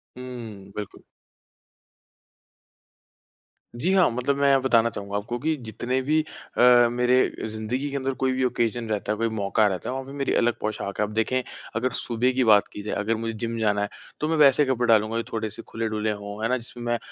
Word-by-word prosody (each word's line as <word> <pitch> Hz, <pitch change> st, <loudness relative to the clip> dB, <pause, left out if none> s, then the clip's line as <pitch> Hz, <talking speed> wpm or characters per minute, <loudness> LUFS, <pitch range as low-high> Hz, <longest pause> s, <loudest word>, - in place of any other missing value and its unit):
हुँ। 115 Hz, -6 st, -8 dB
बिल्कुल। 105 Hz, -2 st, -7 dB, 2.7 s
जी 160 Hz, +10 st, 0 dB
हाँ, 190 Hz, -2 st, +5 dB
मतलब 125 Hz, +4 st, 0 dB
मैं 140 Hz, -1 st, +4 dB
बताना 115 Hz, -3 st, +3 dB
चाहूँगा 100 Hz, -1 st, -4 dB
आपको 120 Hz, +4 st, -3 dB
कि 155 Hz, +4 st, 0 dB
जितने 120 Hz, +4 st, -2 dB
भी 150 Hz, +4 st, +2 dB
अ, 125 Hz, -5 st, +3 dB
मेरे 125 Hz, +1 st, +2 dB, 0.3 s
ज़िंदगी 110 Hz, +6 st, -3 dB
के 140 Hz, -, -6 dB
अंदर 135 Hz, 0 st, -1 dB
कोई 130 Hz, 0 st, 0 dB
भी 130 Hz, 0 st, 0 dB
ओकेज़न 120 Hz, -2 st, 0 dB
रहता 105 Hz, -1 st, -1 dB
है, 105 Hz, -, -1 dB
कोई 115 Hz, +1 st, 0 dB
मौक़ा 110 Hz, 0 st, +1 dB
रहता 95 Hz, -3 st, -3 dB
है, -, -, -2 dB
वहाँ 135 Hz, 0 st, -4 dB
पे 135 Hz, -, -10 dB
मेरी 140 Hz, -1 st, 0 dB
अलग 120 Hz, 0 st, +3 dB
पोशाक 105 Hz, -2 st, -3 dB
है। -, -, +3 dB
अब 105 Hz, -, -9 dB
देखें, 110 Hz, +4 st, +1 dB, 0.3 s
अगर 120 Hz, +2 st, +1 dB
सुबह 120 Hz, +2 st, +1 dB
की 130 Hz, 0 st, +2 dB
बात 105 Hz, -3 st, +5 dB
की -, -, -6 dB
जाए, 105 Hz, -, -3 dB
अगर 110 Hz, +3 st, 0 dB
मुझे 115 Hz, 0 st, -3 dB
जिम 115 Hz, +1 st, -4 dB
जाना 105 Hz, -2 st, +1 dB
है, 105 Hz, -, -1 dB, 0.3 s
तो 150 Hz, -, 0 dB
मैं 160 Hz, -, +1 dB
वैसे 145 Hz, 0 st, +6 dB
कपड़े 125 Hz, -2 st, 0 dB
डालूँगा, 110 Hz, 0 st, +3 dB
जो 115 Hz, -, -1 dB
थोड़े-से 110 Hz, -2 st, -4 dB
खुले-डुले 110 Hz, -1 st, -2 dB
हों, 100 Hz, 0 st, -7 dB
है 115 Hz, -, +1 dB
ना 130 Hz, -, +2 dB
जिसमें 120 Hz, 0 st, -8 dB
मैं 120 Hz, 0 st, +1 dB
115 Hz, 205 wpm, -25 LUFS, 110-130 Hz, 2.7 s, वैसे